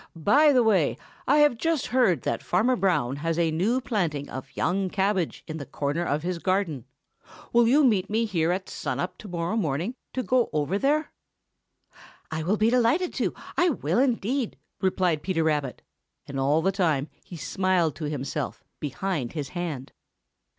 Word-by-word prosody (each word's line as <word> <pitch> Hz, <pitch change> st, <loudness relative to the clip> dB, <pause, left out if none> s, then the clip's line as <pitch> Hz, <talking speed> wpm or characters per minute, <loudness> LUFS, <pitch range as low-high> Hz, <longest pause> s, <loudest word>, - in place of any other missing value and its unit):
By 280 Hz, -, +5 dB
the 255 Hz, -3 st, +4 dB
way, 220 Hz, -4 st, +2 dB, 0.3 s
I -, -, +5 dB
have 245 Hz, -6 st, 0 dB
just 325 Hz, -2 st, 0 dB
heard 225 Hz, -, +2 dB
that -, -, -1 dB
Farmer 230 Hz, +8 st, +2 dB
Brown 150 Hz, -, +1 dB
has 165 Hz, +2 st, -1 dB
a 165 Hz, -2 st, +2 dB
new 200 Hz, +11 st, +1 dB
planting 170 Hz, -, -2 dB
of 130 Hz, -, -6 dB
young 190 Hz, +2 st, 0 dB
cabbage 190 Hz, -2 st, 0 dB
in 155 Hz, -1 st, -5 dB
the 140 Hz, -, -6 dB
corner 145 Hz, +4 st, -2 dB
of 150 Hz, -2 st, -1 dB
his 180 Hz, -1 st, -2 dB
garden. 185 Hz, -, -1 dB, 0.7 s
Will 235 Hz, -1 st, +5 dB
you 285 Hz, +5 st, +5 dB
meet 210 Hz, -7 st, +3 dB
me 225 Hz, +2 st, +1 dB
here 170 Hz, -5 st, +1 dB
at 185 Hz, +1 st, -2 dB
sun -, -, -4 dB
up 180 Hz, -, -3 dB
to 215 Hz, -, -9 dB
morrow 175 Hz, +2 st, -2 dB
morning 170 Hz, -, -1 dB, 0.2 s
to 255 Hz, -, -1 dB
go 250 Hz, -2 st, +2 dB
over 155 Hz, +6 st, 0 dB
there?" 300 Hz, +4 st, +1 dB, 1.2 s
"I 160 Hz, 0 st, -2 dB
will 185 Hz, +7 st, +1 dB
be 220 Hz, +2 st, +3 dB
delighted 250 Hz, +9 st, +2 dB
to, -, -, -1 dB, 0.2 s
I 355 Hz, -, +3 dB
will 265 Hz, -, 0 dB
indeed!" 250 Hz, -1 st, 0 dB, 0.2 s
replied 180 Hz, -4 st, +1 dB
Peter 165 Hz, -1 st, 0 dB
Rabbit, 150 Hz, -5 st, -1 dB, 0.4 s
and 140 Hz, -1 st, -5 dB
all 145 Hz, +4 st, +2 dB
the 190 Hz, -, +3 dB
time 160 Hz, -7 st, +1 dB, 0.2 s
he 175 Hz, -, -10 dB
smiled 185 Hz, -2 st, +1 dB
to 155 Hz, -, -4 dB
himself 140 Hz, -2 st, -4 dB, 0.2 s
behind 150 Hz, -3 st, -3 dB
his 150 Hz, -4 st, -4 dB
hand. 165 Hz, -7 st, -5 dB
185 Hz, 175 wpm, -26 LUFS, 155-230 Hz, 1.2 s, By